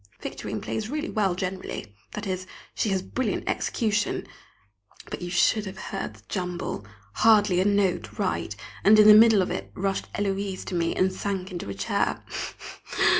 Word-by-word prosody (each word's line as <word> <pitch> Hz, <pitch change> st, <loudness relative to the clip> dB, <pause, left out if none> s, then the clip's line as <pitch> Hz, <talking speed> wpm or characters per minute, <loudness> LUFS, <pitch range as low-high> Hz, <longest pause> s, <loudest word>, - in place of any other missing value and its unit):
Victorine -, -, -5 dB
plays 220 Hz, 0 st, -3 dB
really 305 Hz, +4 st, -3 dB
well 195 Hz, -5 st, +1 dB
generally 185 Hz, -, -4 dB, 0.2 s
that 210 Hz, -, -4 dB
is, 185 Hz, -1 st, -3 dB, 0.3 s
she 215 Hz, -, 0 dB
has 190 Hz, -1 st, 0 dB
brilliant 260 Hz, +6 st, -2 dB
execution 210 Hz, -3 st, 0 dB, 0.9 s
but -, -, -4 dB
you 175 Hz, -, -4 dB
should 205 Hz, +4 st, +3 dB
have 190 Hz, 0 st, -7 dB
heard 195 Hz, -1 st, -5 dB
the -, -, -18 dB
jumble! 180 Hz, -, -3 dB, 0.3 s
hardly 210 Hz, -5 st, +5 dB
a -, -, +1 dB
note 200 Hz, -2 st, +1 dB
right, -, -, -1 dB, 0.3 s
and 215 Hz, +2 st, +7 dB
in 210 Hz, 0 st, +8 dB
the 215 Hz, -, +11 dB
middle 215 Hz, -2 st, +7 dB
of -, -, -3 dB
it -, -, -3 dB
up -, -, -24 dB
rushed 195 Hz, 0 st, -2 dB
Héloise 195 Hz, -1 st, -2 dB
to -, -, -5 dB
me 170 Hz, -1 st, 0 dB
and 185 Hz, 0 st, +2 dB
sank 190 Hz, -1 st, -3 dB
into 175 Hz, -, -5 dB
a 100 Hz, -, -4 dB
chair. 100 Hz, -, 0 dB
195 Hz, 175 wpm, -26 LUFS, 185-210 Hz, 0.9 s, the